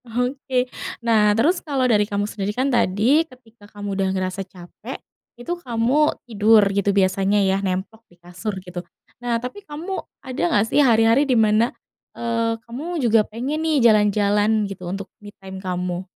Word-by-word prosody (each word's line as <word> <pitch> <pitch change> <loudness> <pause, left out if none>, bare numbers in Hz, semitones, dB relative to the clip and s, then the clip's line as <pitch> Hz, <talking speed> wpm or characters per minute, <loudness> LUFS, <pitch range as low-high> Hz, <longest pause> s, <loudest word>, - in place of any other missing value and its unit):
Oke. 250 +2 -1 0.4
Nah, 210 -2 +4
terus 330 +10 +2
kalau 275 -4 -1
dari 210 -4 +2
kamu 205 0 -1
sendiri 205 0 -4
kan 265 +1 +1
tadi 235 +7 +3
ketika 235 -8 -13
kamu 205 -1 -6
udah 195 0 0
ngerasa 185 +1 -2
capek, 175 -2 -10 0.4
itu 240 +9 -4
kamu 250 +4 +1
tidur 215 -2 +4
gitu 200 0 +1
biasanya 195 +1 +2
ya, 190 +1 +1
nemplok 190 +3 -3
di 175 - -23
kasur 180 +4 -6
gitu. 180 0 -6 0.4
Nah, 240 -1 0
tapi 250 - -7
kamu 355 +2 -5 0.2
ada 255 -6 -5
enggak 205 +1 +3
sih 295 - +5
hari-hari 235 +2 +4
di 250 - +3
mana, 220 +2 +3 0.5
eee, 230 -1 -1
kamu 300 +9 -5
juga 230 -6 +4
pengen 260 +8 -3
nih 320 -2 +1
jalan-jalan 210 0 +3
gitu 185 -3 -7
untuk 195 +2 -4 0.2
me 205 - -10
time 190 -1 -9
kamu? 180 -1 -3
220 Hz, 165 wpm, -22 LUFS, 200-250 Hz, 0.5 s, sih